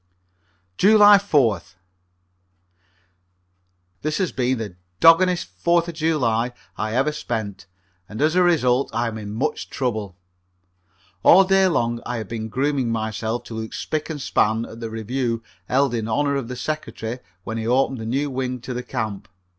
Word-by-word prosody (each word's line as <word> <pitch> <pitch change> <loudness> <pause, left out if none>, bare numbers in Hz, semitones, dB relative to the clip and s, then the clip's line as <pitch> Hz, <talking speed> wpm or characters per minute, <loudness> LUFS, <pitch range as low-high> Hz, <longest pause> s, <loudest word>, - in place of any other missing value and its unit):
July 205 +1 +8
4th. 115 - +1 2.3
This 155 0 -1
has 185 -3 0
been 130 0 0
the 105 -5 -6 0.2
doggonest 175 - +5
Fourth 170 - +2
of 170 - -5
July 125 -7 0 0.2
I 110 +1 -3
ever 135 +4 +2
spent, 110 -10 -5 0.4
and 110 - -7
as 155 +2 +3
a 180 - +4
result 140 -7 +3
I 120 +1 +1
am 110 -1 -6
in 105 -1 -7
much 135 +8 -2
trouble. 110 -8 -3 1.0
All 190 - +7
day 195 0 +4
long 120 -8 0
I 125 - -3
have 110 -3 -5
been 110 -1 -4
grooming 135 +1 0
myself 110 +1 -2
to - - -10
look 110 0 -5
spic 155 +1 -3
and 155 -2 -4
span 110 -3 +1
at 115 - -11
the 115 -1 -5
review 115 +1 -2 0.3
held 135 0 +2
in 110 -2 -2
honor 140 +5 +1
of 135 -4 -2
the 125 - -5
Secretary 125 -4 -4 0.2
when 115 +3 -4
he 110 - -3
opened 130 +1 +2
the 110 - -5
new 140 +4 -1
wing 130 -1 -3
to 125 - -5
the 125 - -3
camp. 110 -6 -4
125 Hz, 160 wpm, -22 LUFS, 110-150 Hz, 2.3 s, July